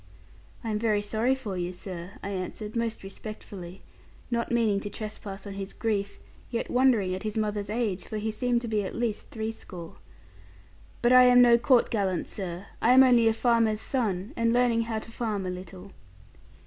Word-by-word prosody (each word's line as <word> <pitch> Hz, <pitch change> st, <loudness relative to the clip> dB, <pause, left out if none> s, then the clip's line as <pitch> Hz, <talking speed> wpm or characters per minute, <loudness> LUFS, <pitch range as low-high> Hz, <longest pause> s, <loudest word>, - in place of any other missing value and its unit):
'I 225 Hz, -, -2 dB
am 210 Hz, -, 0 dB
very 210 Hz, -2 st, +1 dB
sorry 225 Hz, +5 st, +1 dB
for 225 Hz, -8 st, -5 dB
you, 175 Hz, 0 st, -2 dB
sir,' 180 Hz, 0 st, -7 dB
I 200 Hz, -, -3 dB
answered 200 Hz, +3 st, -5 dB
most 230 Hz, -2 st, -2 dB
respectfully, 195 Hz, -2 st, -9 dB, 0.5 s
not 235 Hz, 0 st, -1 dB
meaning 225 Hz, -4 st, +2 dB
to 205 Hz, -, -5 dB
trespass 210 Hz, -2 st, -7 dB
on 200 Hz, -, -6 dB
his 195 Hz, 0 st, -6 dB
grief, 200 Hz, -3 st, -2 dB, 0.3 s
yet 235 Hz, -1 st, -3 dB
wondering 245 Hz, -7 st, +3 dB
at 185 Hz, -, -4 dB
his 215 Hz, 0 st, -3 dB
mother's 210 Hz, -1 st, -1 dB
age; 215 Hz, -4 st, -1 dB
for 215 Hz, -, -5 dB
he 215 Hz, +1 st, -2 dB
seemed 240 Hz, +2 st, 0 dB
to 240 Hz, -, -5 dB
be 215 Hz, -2 st, 0 dB
at 190 Hz, -, -5 dB
least 235 Hz, -3 st, -2 dB
threescore; 220 Hz, -6 st, -6 dB, 1.1 s
'but 240 Hz, +1 st, +5 dB
I 255 Hz, 0 st, +9 dB
am 245 Hz, 0 st, +7 dB
no 235 Hz, -1 st, +6 dB
court 245 Hz, 0 st, +4 dB
gallant, 195 Hz, -5 st, 0 dB
sir; 185 Hz, -1 st, -5 dB, 0.2 s
I 240 Hz, -, +5 dB
am 260 Hz, +1 st, +9 dB
only 240 Hz, -3 st, +5 dB
a 225 Hz, -, +4 dB
farmer's 230 Hz, -3 st, +2 dB
son, 215 Hz, -3 st, -2 dB
and 230 Hz, -1 st, +2 dB
learning 235 Hz, -1 st, +3 dB
how 225 Hz, -1 st, -2 dB
to 220 Hz, -, -7 dB
farm 215 Hz, -5 st, -2 dB
a 180 Hz, -, -2 dB
little.' 185 Hz, +1 st, -9 dB
215 Hz, 185 wpm, -27 LUFS, 195-235 Hz, 1.1 s, I